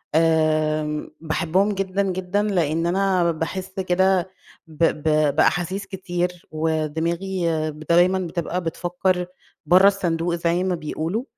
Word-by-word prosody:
آمم 155 -2 +1
باحبهم 170 +5 +1
جدًا، 195 0 -1
جدًا 185 +1 -1
لإن 165 -5 0
أنا 185 -2 +2
باحس 185 +4 -5
كده 190 0 +2 0.4
ب 160 +1 -4
ب 155 -2 +2
بأحاسيس 175 +5 +1
كتير، 180 -2 -4
ودماغي 160 +4 -1 0.4
دايمًا 180 +3 +4
بتبقى 175 0 -3
بتفكّر 180 +2 -1 0.4
برّه 185 +3 +6
الصندوق 175 -4 0
زي 170 +1 0
ما 185 -1 0
بيقولوا، 165 +7 -3
175 Hz, 110 wpm, -22 LUFS, 160-190 Hz, 0.4 s, برّه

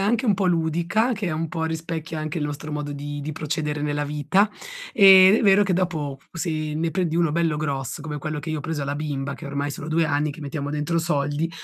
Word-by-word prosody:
anche 230 +5 +1
un 210 - +4
po' 190 -1 0
ludica, 170 +8 +1
che 215 -3 -3
è - - -2
un 160 +1 -2
po' 165 -1 -4
rispecchia 160 0 -3
anche 155 +2 -3
il 150 - -2
nostro 150 +1 -5
modo 150 -1 -3
di 145 0 -5
di 150 +2 -4
procedere 150 -1 -3
nella 145 0 -1
vita. 150 +8 +1 0.4
Ed 190 0 +8
è - - +1
vero 200 0 +6
che 190 -2 +1
dopo, 160 -7 -1
se 165 +1 -3 0.2
ne 165 +1 -1
prendi 175 -3 -1
uno 170 -2 +2
bello 165 -1 +1
grosso, 140 -4 -3
come 150 -2 -5
quello 150 +1 -4
che 160 - -5
io 155 - -2
ho - - -4
preso 155 -1 -3
alla 140 +1 -2
bimba, 140 -2 -3
che 160 - -9
ormai 140 +1 -2
sono 145 - -7
2 160 0 +2
anni 145 0 0
che 155 - -12
mettiamo 145 0 -4
dentro 150 +3 -1
soldi, 150 -1 0
155 Hz, 235 wpm, -24 LUFS, 145-170 Hz, 0.4 s, Ed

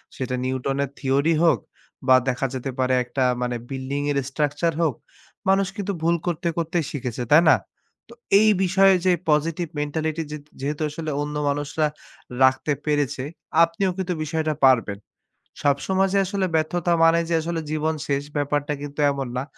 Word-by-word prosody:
সেটা 125 -1 -3
নিউটনের 135 +2 -1
থিওরি 140 +4 +2
হোক 155 -9 +4 0.5
বা 130 - +7
দেখা 130 +1 0
যেতে 130 +1 -4
পারে 130 0 +2
একটা 125 +2 -2 0.2
মানে 125 0 -1
building 135 +1 -3
এর 140 - 0
structure 145 +3 0
হোক, 155 -7 +1 0.5
মানুষ 195 0 +3
কিন্তু 200 -1 -2
ভুল 170 +1 +3
করতে 170 0 -1
করতেই 165 0 -1
শিখেছে, 125 -4 -4
তাই 165 +3 +8
না? - - +8 0.8
এই 215 0 +5
বিষয়ে 190 +1 +5
যে 185 - +5 0.2
positive 160 +3 +1
mentality 155 +2 -2
যে 150 - -4 0.2
যেহেতু 145 +3 -3
আসলে 155 +1 -5
অন্য 150 0 -4
মানুষরা 145 +2 0 0.6
রাখতে 130 +3 +3
পেরেছে, 145 -3 0 0.4
আপনিও 170 +3 0
কিন্তু 185 -1 -2
বিষয়টা 155 0 -1
পারবেন। 115 -6 +3 0.6
সব 145 -1 +3
সময় 190 0 +2
যে 200 - +4
আসলে 195 0 -1
ব্যর্থতা 170 +2 0
মানে 165 +1 +5
যে 170 - +2
আসলে 165 0 -3
জীবন 155 +1 0
শেষ, 140 0 0
ব্যাপারটা 145 +1 0
কিন্তু 145 +1 -7
এমন 135 -2 -3
না। 130 - -1
150 Hz, 160 wpm, -23 LUFS, 140-170 Hz, 0.8 s, তাই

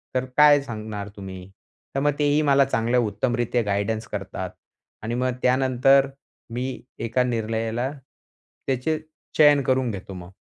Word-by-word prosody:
तर 130 - +1
काय 150 -1 +7
सांगणार 110 -5 -6
तुम्ही?" 95 -1 -8 0.5
तर - - +2
मग 145 - +3
तेही 145 +1 +3
मला 140 -2 +4
चांगल्या 120 -1 +1
उत्तमरीत्या 120 +2 0
गाईडन्स 110 +3 -1
करतात. 95 -2 -5 0.5
आणि 115 +2 -2
मग 125 +1 0
त्यानंतर 130 +1 +4 0.4
मी 130 +2 -3 0.2
एका 115 +2 +1
निर्णयाला 115 +1 -2
त्याचे 135 +1 -5 0.4
चयन 145 -2 +6
करून 130 -2 +1
घेतो 100 -1 -7
मग. 90 0 -9
120 Hz, 130 wpm, -24 LUFS, 110-135 Hz, 0.5 s, काय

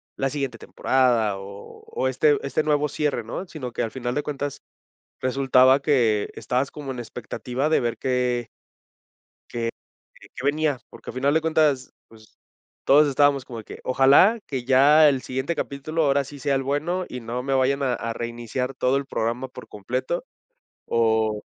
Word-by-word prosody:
la 135 - -1
siguiente 135 -4 -3
temporada 115 -6 +1
o 100 - -11
o 460 +1 -2
este 445 -2 +3
este 155 - 0
nuevo 150 -1 +1
cierre, 145 -5 -1
¿no?, 115 - -5
sino 135 -7 -7
que - - -2
al 115 - -3
final 125 -1 -4
de 145 - -1
cuentas 145 -1 -4 0.6
resultaba 130 0 +4
que 120 -8 +2
estabas 130 +3 -1
como 145 -3 -6
en 125 - -6
expectativa 125 +4 -4
de 160 - +3
ver 120 -1 -2
que 125 -2 -1 1.0
que 115 -1 -2 0.7
que 125 - -8
venía, 145 -2 +1
porque - - -10
al - - -12
final 140 +3 +1
de 160 - +3
cuentas, 155 -5 +1 0.2
pues, 110 -1 -19 0.5
todos 150 +2 +6
estábamos 140 -1 +3
como 120 -3 -8
de 110 - -9
que - - -10
ojalá 140 - +5
que 130 -3 -4
ya 145 +4 +6
el 135 -2 +1
siguiente 130 +6 -3
capítulo 155 +3 -3
ahora 140 -1 +2
sí 145 +2 -11
sea 140 0 0
el 135 - 0
bueno 155 +7 -1
y 125 - -6
no 120 +2 -4
me 135 +1 -3
vayan 135 +1 +2
a 130 -2 +1
a 115 -1 -3
reiniciar 120 +3 -4
todo 130 +1 +1
el 140 - -5
programa 120 +1 -2
por 130 - -12
completo 130 - -3 0.6
o 110 -2 +1
130 Hz, 175 wpm, -24 LUFS, 120-145 Hz, 1.0 s, todos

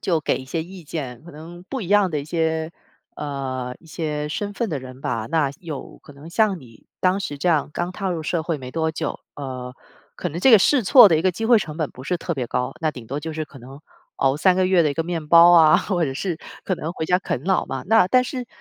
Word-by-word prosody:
就 170 -4 0
给 - - 0
一 - - -7
些 160 +5 -3
意 180 0 -11
见， 135 -6 -6
可 170 - -11
能 170 +4 -11
不 265 - -4
一 185 - -6
样 205 -1 +4
的 150 -3 -1
一 140 - -8
些， 160 0 -1 0.4
呃， 130 -3 -4
一 - - -20
些 150 -2 -3
身 205 +6 -3
份 230 +3 -2
的 150 - -2
人 130 0 -11
吧， 115 -4 -2
那 155 -4 +2
有 160 -6 -8
可 145 - -15
能 145 +4 -12
像 200 -2 +1
你 115 -4 -17
当 185 +1 +2
时 170 -8 -4
这 175 - -1
样 160 -4 +2
刚 175 +3 -2
踏 195 +1 -4
入 165 -3 -3
社 165 +1 -1
会 165 -2 -2
没 130 -2 -8
多 160 +2 -1
久， - - -4 0.2
呃， 130 -3 -6 0.4
可 180 - -3
能 165 +1 -6
这 260 - +6
个 220 - +10
试 255 +5 +3
错 235 +3 +9
的 165 - +3
一 - - -1
个 185 0 +2
机 225 +6 -3
会 235 -1 +6
成 155 -7 -5
本 155 -3 -2
不 130 - -12
是 180 +5 0
特 170 - -4
别 130 -6 -3
高， 125 +1 -2
那 160 -1 +1
顶 125 -5 -10
多 140 - -3
就 160 +2 -5
是 155 0 -3
可 145 -2 -15
能 135 +3 -12 0.4
熬 135 +1 +2
3 185 +4 +4
个 185 0 +2
月 185 -2 +4
的 150 - +2
一 - - -4
个 165 - 0
面 165 -2 -4
包 170 +2 +8
啊， 160 -3 +7
或 180 -4 0
者 135 -3 -3
是 170 +2 -3 0.3
可 185 - 0
能 160 +1 -4
回 160 - -4
家 180 +3 +2
啃 160 -8 -3
老 190 +3 +1
嘛。 135 -1 -4
那 220 -3 +5
但 255 +6 +4
是， 250 -1 -5
160 Hz, 285 characters per minute, -22 LUFS, 140-185 Hz, 0.4 s, 个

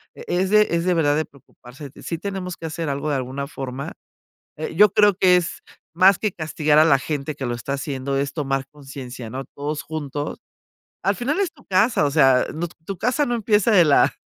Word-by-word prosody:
E - - -10
es 185 +2 0
de 210 0 +5
es 170 +1 0
de 180 - +3
verdad, 145 -3 +2
de 155 - 0
preocuparse. 135 0 -14
Sí 165 - -3
tenemos 190 -2 -5
que - - -8
hacer 160 0 -4
algo, 140 +2 -2
de 140 - +1
alguna 130 +2 -4
forma. 135 -1 -6 0.7
Eh, 160 - -5
yo 210 +2 +7
creo 210 -1 +5
que 180 -2 +5
es 175 -2 -2 0.3
más 190 +1 +6
que 215 - 0
castigar 155 -2 +1
a 155 - +7
la 140 -4 +5
gente 145 +1 -3
que 130 - -4
lo 120 - -2
está 120 +3 -5
haciendo, 135 -1 -3
es 140 0 -2
tomar 135 -3 -2
consciencia, 135 -5 -9
¿no?, 135 +3 -5
todos 150 +1 -3
juntos. 145 -2 -5 0.7
Al 200 +3 +2
final 275 - -1
es 395 -3 0
tu 285 - -21
casa, 195 -2 +2
o 140 - 0
sea, 135 -4 +4
no 170 +3 -3 0.2
tu 195 -2 -5
casa 250 +5 +1
no 240 -2 -1
empieza 215 0 +2
de 180 -5 +7
la 145 - +4
155 Hz, 215 wpm, -22 LUFS, 140-190 Hz, 0.7 s, yo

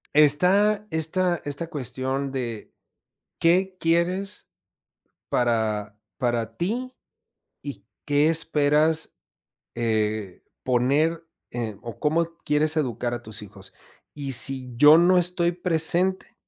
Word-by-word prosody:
Está, 190 +8 +3
esta 170 +2 -1
esta 145 +3 -5
cuestión 135 -1 -3
de 120 -5 -5 0.7
¿qué 185 +3 +2
quieres 180 - -1 0.8
para 110 -3 -1 0.2
para 120 -3 -2
ti 245 - -3 0.7
y 110 -9 -8 0.2
qué 145 +1 +3
esperas 155 0 +1 0.6
eh, 110 -4 -2 0.2
poner 145 +7 +1 0.3
eh 115 -4 -4
o 115 -4 -8
cómo 165 +2 0
quieres 155 +2 +1
educar 120 -5 -1
a 120 -1 -4
tus 110 0 -7
hijos? 95 -2 -13 0.4
Y 140 -2 -4
si 130 0 +4
yo 150 +5 +8
no 180 +2 +5
estoy 175 0 0
presente 180 +2 0
150 Hz, 105 wpm, -24 LUFS, 120-170 Hz, 0.8 s, yo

